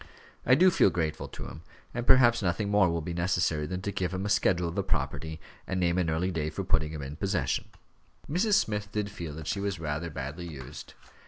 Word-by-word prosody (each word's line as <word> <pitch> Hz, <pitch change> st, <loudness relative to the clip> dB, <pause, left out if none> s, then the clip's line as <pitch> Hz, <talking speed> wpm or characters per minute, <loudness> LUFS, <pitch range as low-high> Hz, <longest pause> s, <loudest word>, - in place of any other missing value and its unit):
I 130 Hz, -, +7 dB
do 185 Hz, +6 st, +6 dB
feel -, -, +5 dB
grateful 80 Hz, -3 st, -2 dB
to -, -, -8 dB
him; 80 Hz, -, -9 dB, 0.3 s
and 120 Hz, 0 st, -3 dB
perhaps 120 Hz, -2 st, +6 dB
nothing 95 Hz, +2 st, 0 dB
more 100 Hz, -3 st, +5 dB
will 85 Hz, 0 st, -1 dB
be 85 Hz, -, -4 dB
necessary 85 Hz, -3 st, +1 dB
than 90 Hz, +2 st, -4 dB
to 100 Hz, -, -1 dB
give 90 Hz, -1 st, -2 dB
him 95 Hz, +2 st, -2 dB
a -, -, -1 dB
schedule 95 Hz, -4 st, +2 dB
of 85 Hz, -, -4 dB
the -, -, 0 dB
property, 80 Hz, 0 st, -2 dB, 0.3 s
and 95 Hz, -, -1 dB
name 90 Hz, 0 st, +2 dB
an 85 Hz, -3 st, +1 dB
early 85 Hz, +4 st, 0 dB
day 80 Hz, -3 st, -1 dB
for 95 Hz, -, -4 dB
putting 80 Hz, -4 st, +1 dB
him 75 Hz, -3 st, -5 dB
in 70 Hz, +3 st, -7 dB
possession." 95 Hz, -1 st, 0 dB, 0.6 s
Mrs. 195 Hz, +8 st, +1 dB
Smith 105 Hz, -, 0 dB
did 105 Hz, -1 st, -2 dB
feel 85 Hz, -6 st, -6 dB
that 80 Hz, -1 st, -7 dB
she 100 Hz, -, -1 dB
was 100 Hz, -3 st, -2 dB
rather 80 Hz, +1 st, -3 dB
badly 75 Hz, +4 st, -5 dB
used. 70 Hz, -3 st, -9 dB
90 Hz, 225 wpm, -29 LUFS, 80-100 Hz, 0.6 s, I